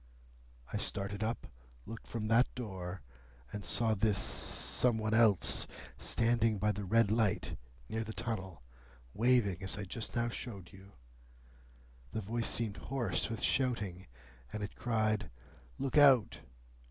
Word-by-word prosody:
I - - 0
started 100 +1 -3
up, 115 +2 -2 0.4
looked 115 0 -9
from 110 -2 -3
that 115 +3 +3
door, 95 - -6 0.5
and 105 - -5
saw 110 +7 +3
this 105 -1 +2
Some 120 +4 +2
one 110 0 -1
else 110 -4 +4 0.3
standing 115 - +1
by 105 +2 +1
the 105 0 -5
red 110 +1 +3
light 110 -3 +1 0.3
near 110 0 -2
the 110 - -6
tunnel, 95 - -5 0.5
waving 110 -5 +2
as 95 +1 0
I 100 - -4
just 110 +4 -5
now 120 0 +1
showed 105 -6 -7
you. 95 +1 -15 1.2
The 110 - -2
voice 115 +3 +1
seemed 110 -3 -2
hoarse 120 -10 -1
with 115 - -4
shouting, 105 -9 0 0.4
and 105 - -4
it 100 - -6
cried, 110 -3 0 0.5
'Look 135 +2 +2
out! 135 -7 +6
110 Hz, 140 wpm, -33 LUFS, 100-115 Hz, 1.2 s, out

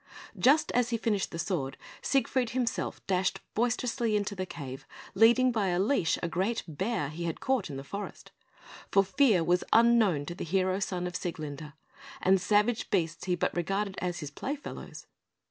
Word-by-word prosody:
Just 285 +5 +4
as 245 -1 +2
he 235 - 0
finished 215 -3 0
the 165 - -6
sword, 160 -6 -2 0.2
Siegfried 260 -3 +1
himself 245 -3 -2
dashed 190 0 0
boisterously 235 -1 0
into 205 0 0
the 185 -1 -4
cave, 135 -6 -8 0.3
leading 240 +3 +5
by 215 -4 0
a 175 -1 +1
leash 195 -5 +2
a - - +1
great 195 +7 -1
bear 185 0 -2
he 170 +3 -5
had 165 - -3
caught 260 -9 0
in 140 - -5
the 135 - -6
forest; 200 +8 -7 0.6
for 195 - +4
fear 200 -2 +3
was 175 +2 +2
unknown 225 -10 +4
to 170 - -5
the 175 - -6
hero 185 +2 +1
son 180 -2 -2
of 180 - -4
Sieglinde, 155 -4 -5 0.5
and 190 0 +3
savage 210 +4 +2
beasts 170 -4 -1
he 180 -1 +1
but - - -1
regarded 195 +3 -1
as 175 -1 -2
his 150 -1 -6
play 275 - -3
fellows. 295 - -9
195 Hz, 180 wpm, -29 LUFS, 170-230 Hz, 0.6 s, leading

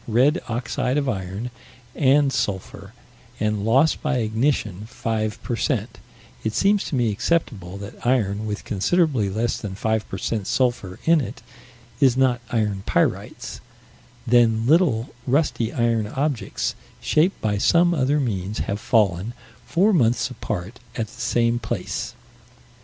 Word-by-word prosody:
red 130 +10 +3
oxide 125 +3 -1
of 140 -2 0
iron, 100 +1 -3 0.4
and 140 0 +3
sulphur 95 -2 -3 0.5
and 105 -1 0
loss 135 +8 +4
by 145 -4 -1
ignition 110 -3 0
5 110 -3 -3
per 120 - -2
cent. - - -2 0.4
It 110 - -1
seems 200 0 +3
to - - -3
me 120 -4 +2
acceptable 105 - -1
that 100 0 -10
iron 110 -4 +1
with 105 0 -4
considerably 125 - +1
less 110 +4 -1
than 100 -3 -5
5 110 +2 -1
per - - -4
cent. 105 -4 -2
sulphur 120 -8 0
in 165 -1 +5
it 120 -1 -7 0.6
is 130 -3 +4
not 130 -2 +3
iron 105 -5 0
pyrites - - -1 0.7
then 115 -2 +4
little, 140 -6 +3
rusty 130 -4 +1
iron 115 -3 +1
objects, 135 +2 -2 0.3
shaped 170 +6 +2
by 105 -2 0
some 175 +8 +4
other 145 -1 +2
means, 105 -6 -2
have 100 - -2
fallen, 105 -2 +1 0.3
four 200 +5 +3
months 125 -5 +2
apart, 110 -1 -5 0.2
at 115 - -1
the 125 0 -11
same 120 0 +2
place. - - -4
M. - - -28
115 Hz, 140 wpm, -23 LUFS, 105-135 Hz, 0.7 s, in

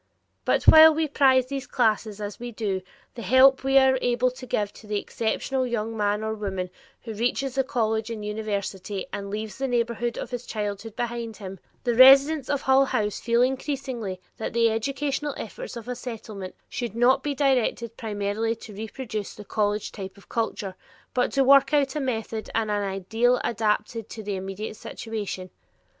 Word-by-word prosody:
But - - +2
while 315 0 +10
we 320 0 +1
prize 265 -3 +4
these 270 0 -5
classes 215 -4 +1
as 205 -1 -6
we 240 0 -6
do 205 -4 -2 0.3
the 240 - -8
help 265 +3 +5
we 270 0 +4
are 265 -1 +5
able 245 +1 +2
to 255 0 -10
give 205 -3 -1
to 215 - -14
the 210 0 -1
exceptional 255 +5 -1
young 225 -1 -2
man 210 0 0
or 220 0 -1
woman 190 -4 -4 0.3
who 225 - -6
reaches 245 +4 -1
the 270 0 +1
college 220 -3 -1
and 215 -2 -5
university 205 -2 -3
and 200 -1 -4
leaves 215 +3 -5
the 270 - 0
neighborhood 235 -1 -1
of - - -5
his 245 0 -5
childhood 210 0 -4
behind 235 -2 -4
him, 195 -2 -8 0.2
the 240 - +1
residents 270 +3 +7
of 285 -1 0
Hull 265 +1 +5
House 210 -5 -1
feel 235 +1 +2
increasingly 255 -7 -2 0.2
that 220 - -4
the 230 -1 +3
educational 275 +5 -2
efforts - - -7
of 235 - -9
a 250 - -2
Settlement 220 -6 -7
should 240 -3 -4
not 245 +2 +4
be 290 -1 -2
directed 250 -4 +1
primarily 215 +1 -2
to 220 -1 -11
reproduce 215 0 -5
the 210 - -10
college 210 0 -1
type 195 -1 -8
of 200 - -18
culture, 215 -4 -2 0.4
but 250 - +1
to 275 - +4
work 275 +1 +6
out 275 -1 +2
a - - 0
method 225 -4 -3
and 220 -2 +1
an 205 0 0
ideal 210 +6 +1
adapted 220 0 -1
to 220 - -7
the 205 -1 -3
immediate 195 +3 -5
situation. 205 -5 -6
230 Hz, 180 wpm, -25 LUFS, 210-260 Hz, 0.4 s, while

